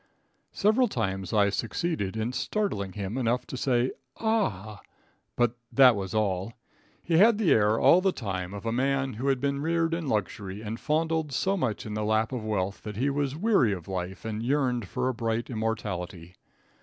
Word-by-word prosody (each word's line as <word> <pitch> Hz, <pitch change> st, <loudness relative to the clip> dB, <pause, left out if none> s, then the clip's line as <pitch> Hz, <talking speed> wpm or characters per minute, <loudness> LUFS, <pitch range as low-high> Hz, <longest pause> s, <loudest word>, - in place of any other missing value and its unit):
Several 220 Hz, +5 st, +3 dB
times 95 Hz, -, -2 dB
I 100 Hz, -2 st, +3 dB
succeeded 110 Hz, -, -2 dB
in 110 Hz, +3 st, -2 dB
startling 105 Hz, -, -2 dB
him 105 Hz, +4 st, -4 dB
enough 125 Hz, 0 st, 0 dB
to -, -, -7 dB
say 125 Hz, -1 st, +1 dB, 0.3 s
"Ah!" 110 Hz, -, -1 dB, 0.5 s
but 120 Hz, 0 st, +1 dB
that 130 Hz, -3 st, +7 dB
was 100 Hz, +1 st, -4 dB
all. 100 Hz, 0 st, 0 dB, 0.5 s
He 165 Hz, -2 st, +2 dB
had 220 Hz, +2 st, +6 dB
the 210 Hz, -6 st, +2 dB
air 105 Hz, +1 st, +4 dB
all 180 Hz, -, +6 dB
the 190 Hz, 0 st, +2 dB
time 95 Hz, -, -4 dB
of 100 Hz, +2 st, -8 dB
a 115 Hz, -, 0 dB
man 135 Hz, +2 st, 0 dB
who 125 Hz, +6 st, -4 dB
had 135 Hz, -2 st, +2 dB
been 140 Hz, +1 st, -1 dB
reared 165 Hz, +1 st, +1 dB
in 165 Hz, -2 st, -2 dB
luxury 105 Hz, -2 st, -3 dB
and 110 Hz, +2 st, -5 dB
fondled 160 Hz, 0 st, 0 dB
so 190 Hz, +8 st, +1 dB
much 130 Hz, -, -2 dB
in 105 Hz, -, -5 dB
the 105 Hz, 0 st, -2 dB
lap 110 Hz, +1 st, +1 dB
of 125 Hz, -4 st, -4 dB
wealth 100 Hz, -2 st, -2 dB
that 105 Hz, -2 st, -7 dB
he 135 Hz, +4 st, +1 dB
was 140 Hz, -1 st, -1 dB
weary 175 Hz, -, +3 dB
of 90 Hz, -4 st, -7 dB
life, 95 Hz, +1 st, -5 dB
and 110 Hz, -1 st, -3 dB
yearned 125 Hz, -4 st, 0 dB
for 125 Hz, -, -2 dB
a 130 Hz, -, 0 dB
bright 115 Hz, +1 st, -2 dB
immortality. 95 Hz, -6 st, -4 dB
115 Hz, 185 wpm, -27 LUFS, 100-140 Hz, 0.5 s, that